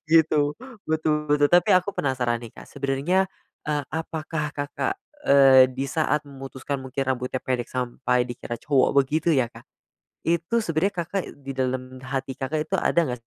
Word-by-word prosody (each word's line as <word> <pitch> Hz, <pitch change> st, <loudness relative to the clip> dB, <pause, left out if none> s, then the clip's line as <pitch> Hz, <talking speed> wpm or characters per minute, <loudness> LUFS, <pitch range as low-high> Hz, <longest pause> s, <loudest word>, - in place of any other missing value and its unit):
Gitu, 155 Hz, -3 st, +4 dB, 0.4 s
betul 155 Hz, -1 st, +1 dB, 0.2 s
betul 145 Hz, 0 st, +5 dB
tapi 175 Hz, +6 st, +4 dB
aku 185 Hz, +1 st, +3 dB
penasaran 125 Hz, -3 st, 0 dB
nih, 115 Hz, -, -8 dB
Kak. -, -, -10 dB
Sebenarnya, 140 Hz, +8 st, 0 dB, 0.4 s
eee, 150 Hz, -1 st, 0 dB
apakah 160 Hz, -1 st, -3 dB
Kakak, 145 Hz, -, -3 dB, 0.2 s
eee, 135 Hz, -2 st, +7 dB
di 135 Hz, +2 st, -3 dB
saat 150 Hz, 0 st, 0 dB
memutuskan 135 Hz, 0 st, -6 dB
mungkin 130 Hz, +1 st, -3 dB
rambutnya 130 Hz, 0 st, -1 dB
pendek 125 Hz, -2 st, -2 dB
sampai 125 Hz, 0 st, 0 dB
dikira 120 Hz, -1 st, -6 dB
cowok 140 Hz, -3 st, +2 dB
begitu 155 Hz, +5 st, +2 dB
ya, 130 Hz, -6 st, +3 dB
Kak? -, -, -14 dB, 0.6 s
Itu 170 Hz, +8 st, +1 dB
sebenernya 175 Hz, +1 st, 0 dB
Kakak 190 Hz, +2 st, -4 dB
di 140 Hz, -1 st, -8 dB
dalem 130 Hz, -1 st, -3 dB
hati 135 Hz, 0 st, -2 dB
Kakak 150 Hz, +4 st, -1 dB
itu -, -, +3 dB
ada -, -, +2 dB
nggak 125 Hz, -5 st, -3 dB
140 Hz, 155 wpm, -25 LUFS, 130-160 Hz, 0.6 s, eee